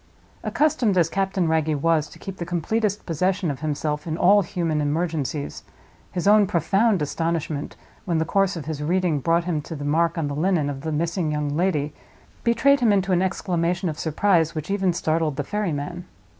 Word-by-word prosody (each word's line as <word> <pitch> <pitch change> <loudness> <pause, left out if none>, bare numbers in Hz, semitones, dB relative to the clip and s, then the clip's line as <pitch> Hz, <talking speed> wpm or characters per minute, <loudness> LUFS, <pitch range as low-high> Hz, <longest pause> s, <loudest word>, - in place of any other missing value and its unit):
Accustomed 250 -10 +1
as 170 -2 +3
Captain 190 -2 0
Wragge 160 -1 +1
was 155 0 +1
to - - -14
keep 195 -1 -8
the - - -4
completest 200 +5 -1
possession 180 +1 0
of 135 - -6
himself 150 0 -2
in 160 0 -2
all 200 +4 +5
human 170 -5 -1
emergencies, 150 -1 -2 0.5
his 180 +1 -2
own 210 -1 +6
profound 195 +3 +2
astonishment, 160 -1 -2 0.3
when 170 -4 0
the 160 - +1
course 195 +2 +1
of 160 -5 -6
his 155 -2 -4
reading 170 -1 +1
brought 165 +5 +2
him 170 -4 -1
to 160 - -7
the 145 -1 -6
mark 165 +3 +1
on 160 -3 0
the 145 - -3
linen 155 -1 +1
of 135 -1 -7
the 160 +1 -3
missing 165 +1 -1
young 150 -1 -1
lady, 150 -4 0 0.5
betrayed 275 +4 +4
him 235 -4 +3
into 195 -1 +1
an 180 -1 +3
exclamation 175 -1 -1
of 155 - -6
surprise 165 0 +2
which 155 +4 -4
even 195 -2 +2
startled 160 -3 0
the 145 - -2
ferryman. 175 -2 -3
170 Hz, 185 wpm, -23 LUFS, 155-190 Hz, 0.5 s, own